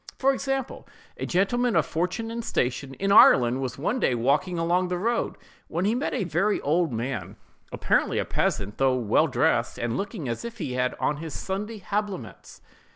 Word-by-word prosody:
For 275 Hz, +1 st, +3 dB
example, 270 Hz, -1 st, -3 dB, 0.3 s
a -, -, -5 dB
gentleman 230 Hz, +6 st, +1 dB
of -, -, +3 dB
fortune 185 Hz, +7 st, -2 dB
and 235 Hz, 0 st, -4 dB
station, 130 Hz, -, -2 dB
in 195 Hz, +5 st, -1 dB
Ireland, 130 Hz, -, +6 dB
was 130 Hz, -1 st, -4 dB
one 210 Hz, -, -1 dB
day 125 Hz, -, +2 dB
walking 145 Hz, +10 st, +1 dB
along 175 Hz, +2 st, +1 dB
the 180 Hz, 0 st, -2 dB
road, 230 Hz, +5 st, -1 dB, 0.3 s
when 170 Hz, +3 st, -2 dB
he 210 Hz, -, +2 dB
met 250 Hz, +4 st, -1 dB
a -, -, 0 dB
very 180 Hz, +5 st, +1 dB
old 160 Hz, +1 st, +1 dB
man, 115 Hz, -4 st, -4 dB, 0.4 s
apparently -, -, +1 dB
a -, -, 0 dB
peasant, 100 Hz, +1 st, -1 dB
though 130 Hz, -1 st, +3 dB
well 120 Hz, +7 st, +2 dB
dressed, 125 Hz, -2 st, +1 dB
and 120 Hz, 0 st, -2 dB
looking 200 Hz, -, -4 dB
as 115 Hz, -, -3 dB
if 235 Hz, 0 st, -7 dB
he 150 Hz, -10 st, -4 dB
had 125 Hz, 0 st, 0 dB
on 150 Hz, -, 0 dB
his 160 Hz, 0 st, -6 dB
Sunday 210 Hz, +4 st, -4 dB
habiliments. 200 Hz, -, -4 dB
170 Hz, 185 wpm, -26 LUFS, 130-210 Hz, 0.4 s, Ireland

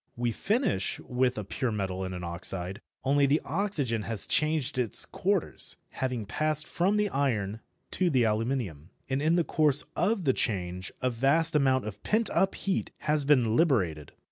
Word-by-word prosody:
We 120 Hz, 0 st, 0 dB
finish 205 Hz, -, 0 dB
with 125 Hz, 0 st, 0 dB
a 105 Hz, -, -3 dB
pure 120 Hz, +5 st, -2 dB
metal 95 Hz, -3 st, -2 dB
and 95 Hz, 0 st, -4 dB
an 90 Hz, -, -6 dB
oxide, 90 Hz, +2 st, -4 dB, 0.2 s
only 140 Hz, +1 st, +3 dB
the 145 Hz, +3 st, +3 dB
oxygen 150 Hz, -, 0 dB
has 110 Hz, 0 st, -1 dB
changed 155 Hz, -3 st, 0 dB
its 115 Hz, -5 st, +2 dB
quarters, -, -, -1 dB
having 125 Hz, -4 st, -3 dB
passed 155 Hz, +7 st, -1 dB
from 195 Hz, +4 st, +1 dB
the 210 Hz, 0 st, +2 dB
iron 110 Hz, -, -1 dB, 0.3 s
to 185 Hz, -2 st, +2 dB
the 130 Hz, -6 st, +3 dB
aluminium. 110 Hz, -, -2 dB, 0.2 s
And 135 Hz, +1 st, +1 dB
in 160 Hz, +3 st, +3 dB
the 175 Hz, -, +3 dB
course 150 Hz, -3 st, +3 dB
of 210 Hz, -2 st, +1 dB
the 135 Hz, -4 st, +3 dB
change 90 Hz, -4 st, -2 dB
a 130 Hz, -, +2 dB
vast 140 Hz, +7 st, +3 dB
amount 130 Hz, -4 st, +3 dB
of 105 Hz, -1 st, -7 dB
pent 220 Hz, +1 st, 0 dB
up 195 Hz, 0 st, +2 dB
heat 195 Hz, -1 st, -1 dB
has 150 Hz, -2 st, +1 dB
been 125 Hz, -6 st, +3 dB
liberated. 95 Hz, -, +1 dB
130 Hz, 170 wpm, -28 LUFS, 105-155 Hz, 0.3 s, only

